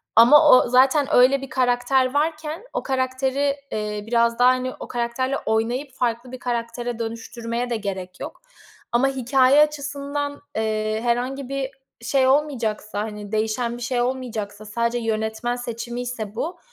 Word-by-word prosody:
Ama 295 +7 +8
o 255 - +6
zaten 265 +3 +4
öyle 265 +2 +5
bir 270 - -7
karakter 255 +1 +2
varken 310 +4 -1
o - - -2
karakteri, 265 +1 0 0.2
eee, 210 -1 -3
biraz 235 0 +2
daha, 250 +1 +7
hani, 255 0 0
o - - -7
karakterle 245 +3 -1
oynayıp 240 +5 -1
farklı 240 0 -2
bir 255 - -7
karaktere 240 0 -3
dönüştürmeye 230 +1 -4
de 240 - 0
gerek 190 -3 -5
yok. - - -8 0.5
Ama 240 +3 +3
hikâye 265 +2 +4
açısından, 285 -1 -2 0.2
eee, 215 0 -1
herhangi 250 +3 -1
bir 275 -1 -3 0.3
şey 260 +3 +2
olmayacaksa, 240 -7 0
hani, 210 -2 -7
değişen 225 +2 -1
bir - - -11
şey 245 0 0
olmayacaksa, 225 -5 -3
sadece 235 +3 -1
yönetmen 220 +1 -2
seçimiyse 240 -2 -5
bu, 330 +9 -4
245 Hz, 145 wpm, -23 LUFS, 225-265 Hz, 0.5 s, Ama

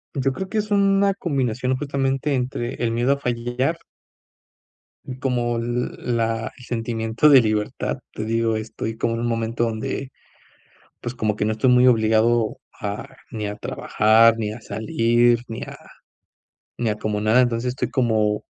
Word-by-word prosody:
Yo 135 -1 +1
creo 190 +7 -5
que 215 +3 -1
es 210 0 -3
una 200 -1 +3
combinación 130 - -1
justamente 135 +1 -1
entre 125 -2 -2
el 120 -1 -1
miedo 120 +4 +2
a 140 - -3
fallar 125 +4 -1 1.3
y 130 -1 -7
como 120 -3 0
l 120 +1 -2
la 115 -2 -1
el 125 - -14
sentimiento 115 +2 0
de 135 -3 +8
libertad, 110 -2 -1 0.2
te 110 - -4
digo, 115 0 0
estoy 110 0 -5
como 115 0 0
en - - -3
un 120 - -1
momento 115 0 -1
donde, 115 +4 -4 0.9
pues, 120 - -5
como 110 -3 -1
que - - -1
no 110 - +1
estoy 110 +4 +1
muy 125 0 +5
obligado 110 -1 +3 0.2
a 100 0 -4 0.2
ni 110 -3 -4
a 105 0 -4
trabajar, 110 +1 +3
ni 105 -2 -2
a 115 - -9
salir, 115 +2 +2
ni 115 - -6
a - - -7 1.0
ni 120 - 0
a 105 - -2
como 105 -1 -2
nada, 110 +4 +4
entonces, 120 0 0
estoy 130 - -3
como, 110 -5 +1
120 Hz, 165 wpm, -22 LUFS, 110-130 Hz, 1.3 s, de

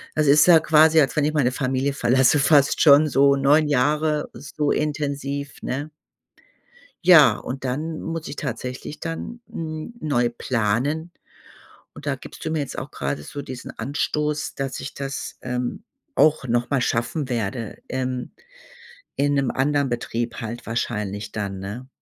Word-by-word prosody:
Es 155 -1 +2
ist 145 +2 +7
ja 170 -3 +8
quasi, 160 0 +5
als 135 -3 +2
wenn 150 - +2
ich 150 - +2
meine 130 -4 +2
Familie 135 +1 -1
verlasse, 130 +3 +3
fast 140 0 +4
schon 150 0 +7
so 140 0 +4
9 150 +2 +4
Jahre 150 +3 +1
so 145 +1 -2
intensiv, 140 -1 -2
ne? 140 +4 -3 1.2
Ja, 155 -10 +8
und 135 +1 -6
dann 155 +5 -3
muss 165 -1 -4
ich - - -7
tatsächlich 130 +2 -5
dann, 165 +8 -5
hm, 155 +7 -6
neu 125 - +1
planen. 125 +8 -1 0.8
Und - - -11
da - - +1
gibst - - -11
du - - -1
mir 160 -1 -1
jetzt 140 - -4
auch 130 - -7
grade 70 +1 -3
so 145 - -7
diesen 130 -2 -8
Anstoß, 150 +4 -2
dass 135 -1 -4
ich 140 - -6
das, 140 0 -5
ähm, 125 +6 -3 0.3
auch 155 -3 +3
noch 120 +3 0
mal 135 -3 +2
schaffen 125 +5 -1
werde, 115 -1 -3
ähm, 130 -1 -3 0.8
in 145 0 +1
'nem 135 -2 +1
anderen 140 +1 +1
Betrieb 120 -1 -3
halt 115 +2 -6
wahrscheinlich 105 -2 -3
dann, 100 -3 -4
ne? 105 +7 -7
140 Hz, 155 wpm, -23 LUFS, 125-150 Hz, 1.2 s, ja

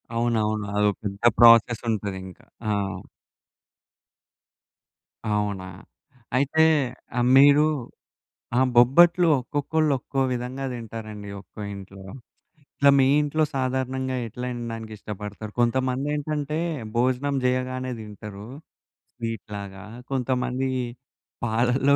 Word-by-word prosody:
అవునవును. 110 -3 0
అదో 105 0 +3
పెద్ద 100 0 -5 0.2
ప్రాసెస్ 115 0 +7
ఉంటదింకా. 95 -4 -4 0.2
ఆ! - - +2 2.6
అవునా! 105 -3 -1 0.7
అయితే 145 +4 +3 0.5
ఆ - - +3 0.2
మీరు 145 +2 +7 0.9
ఆ - - +5 0.2
బొబ్బట్లు 170 +8 +6
ఒక్కొక్కళ్ళు 145 +4 0
ఒక్కో 135 +2 -2
విధంగా 125 +2 -3
దింటారండి 110 -3 -7
ఒక్కో 105 - -12
ఇంట్లో. 95 0 -11 0.7
ఇట్లా 140 - +5
మీ 130 - +5
ఇంట్లో 155 +2 0
సాధారణంగా 130 0 -1
ఎట్లా 125 +3 -6
తినడానికి 115 -2 -6
ఇష్టపడతారు? 105 +1 -7
కొంతమంది 130 +3 +1
ఏంటంటే 150 +1 -2 0.4
భోజనం 130 +3 +1
జేయగానే 130 0 -1
దింటరు 105 0 -9 0.7
స్వీటులాగా. 100 -4 -6 0.3
కొంతమంది 130 0 -1 0.8
పాలల్లో 125 +5 +2
120 Hz, 90 wpm, -25 LUFS, 105-135 Hz, 2.6 s, ప్రాసెస్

